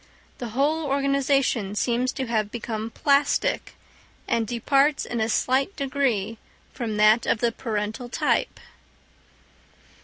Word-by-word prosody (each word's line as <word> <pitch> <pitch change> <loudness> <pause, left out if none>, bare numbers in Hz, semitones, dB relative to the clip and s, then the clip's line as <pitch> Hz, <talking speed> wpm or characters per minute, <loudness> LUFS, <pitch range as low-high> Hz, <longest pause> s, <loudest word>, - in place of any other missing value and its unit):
The 240 - -4
whole 305 +3 +1
organisation 275 -6 +1
seems 245 +3 0
to 265 - -3
have 220 -3 -1
become 225 -1 -4
plastic, 280 +4 +1 0.5
and 225 -1 0
departs 275 +5 +2
in 235 -2 -3
a 220 - 0
slight 265 - +1
degree 260 -7 -1 0.3
from 225 -4 -3
that 215 +2 +4
of - - +2
the 235 +1 +1
parental 220 +1 -4
type. - - 0
240 Hz, 120 wpm, -24 LUFS, 220-275 Hz, 0.5 s, that